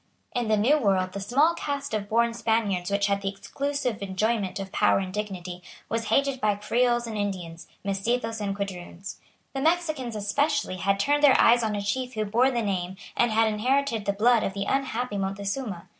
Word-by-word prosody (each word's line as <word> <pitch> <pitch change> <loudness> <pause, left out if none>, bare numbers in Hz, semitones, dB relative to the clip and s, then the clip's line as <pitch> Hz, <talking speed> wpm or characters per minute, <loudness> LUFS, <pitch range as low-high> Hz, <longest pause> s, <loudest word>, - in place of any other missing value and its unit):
In 245 -3 -1
the 215 0 +3
New 265 +9 +4
World 190 -6 +1
the 200 - -5
small 280 +11 +3
caste 285 -5 -4
of 205 -1 -2
born 235 +1 +2
Spaniards 220 -5 0
which 200 0 +1
had 200 0 0
the 195 - -1
exclusive 265 +3 -3
enjoyment 200 0 -1
of 195 -1 -6
power - - +3
and 190 -1 -3
dignity 185 -4 -5 0.3
was 225 0 -1
hated 275 +3 +1
by 210 -1 +2
Creoles 240 +3 +1
and 225 -1 -5
Indians, 185 -5 -4 0.2
Mestizos 225 +3 -1
and 200 -1 -2
Quadroons. 195 -1 -6 0.3
The 270 - -2
Mexicans 310 -7 0
especially 215 +2 0
had 195 +2 +1
turned 290 +7 +2
their 285 -3 +6
eyes 240 +1 +6
on 215 -2 -1
a 205 - -3
chief 250 +5 -2
who 215 0 -1
bore 235 +6 +3
the 240 -3 -1
name 185 -2 -2 0.2
and 240 - +3
had 225 +1 +3
inherited 230 +1 0
the 200 - +1
blood 230 +3 +4
of 195 - -2
the 200 - -2
unhappy 250 -5 -1
Montezuma. 195 +1 -3
215 Hz, 190 wpm, -26 LUFS, 200-250 Hz, 0.3 s, their